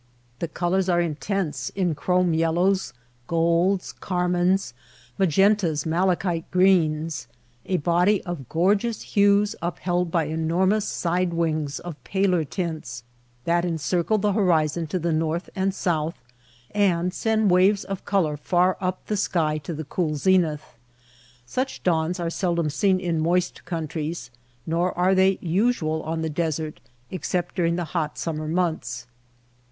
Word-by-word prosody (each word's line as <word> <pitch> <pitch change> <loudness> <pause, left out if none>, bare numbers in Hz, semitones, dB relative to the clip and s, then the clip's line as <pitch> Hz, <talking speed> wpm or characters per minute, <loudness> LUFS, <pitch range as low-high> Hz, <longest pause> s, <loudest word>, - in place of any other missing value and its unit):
The 170 - -2
colors 180 +3 0
are 175 -1 +3
intense 155 -3 -2
in 180 -4 +1
chrome 180 +3 +1
yellows, 175 +4 +1 0.4
golds, 170 +3 +1
car 180 -1 -2
mines, 180 -5 +1 0.5
magentas, 190 -3 +3
malachite 175 0 0
greens 160 -7 +2 0.2
— 120 -1 -36
a 185 -1 +1
body 175 +6 +2
of 170 - -6
gorgeous 200 +7 +1
hues 205 0 +3
upheld 175 +1 -1
by 165 -1 +1
enormous 170 +7 +1
side 175 0 -1
wings 155 -3 -1
of 170 -4 -9
paler 190 -4 +1
tints 150 -7 -5 0.4
that 170 0 +2
encircle 175 +4 0
the 205 0 +1
horizon 165 -5 +2
to 170 - -2
the 170 -1 -1
north 160 +2 -1
and 195 0 +1
south, 165 -4 -1 0.5
and 180 -3 +1
send 220 -2 +1
waves 190 +3 +4
of 195 -1 -5
color 175 -7 +1
far 180 +4 +2
up 185 0 -2
the 215 - -1
sky 160 -6 0
to 150 +3 -7
the 155 +1 -5
cool 155 0 -1
zenith. 155 -5 +1 0.7
Such 255 - -3
dawns 170 +1 +1
are 170 -1 -2
sel 175 -1 0
dom 165 -3 0
seen 190 +3 +2
in 170 -3 -1
moist 175 +3 0
countries, 160 -5 -4 0.3
nor 170 +3 0
are 180 +2 +3
they 190 0 +4
usual 170 -3 +1
on 160 +1 -3
the 160 - -1
desert, 160 -1 -2 0.3
except 180 -1 -2
during 170 -2 +1
the 175 -1 -2
hot 155 -4 -1
summer 155 -2 -3
months. 170 -4 -1
175 Hz, 145 wpm, -24 LUFS, 160-185 Hz, 0.7 s, waves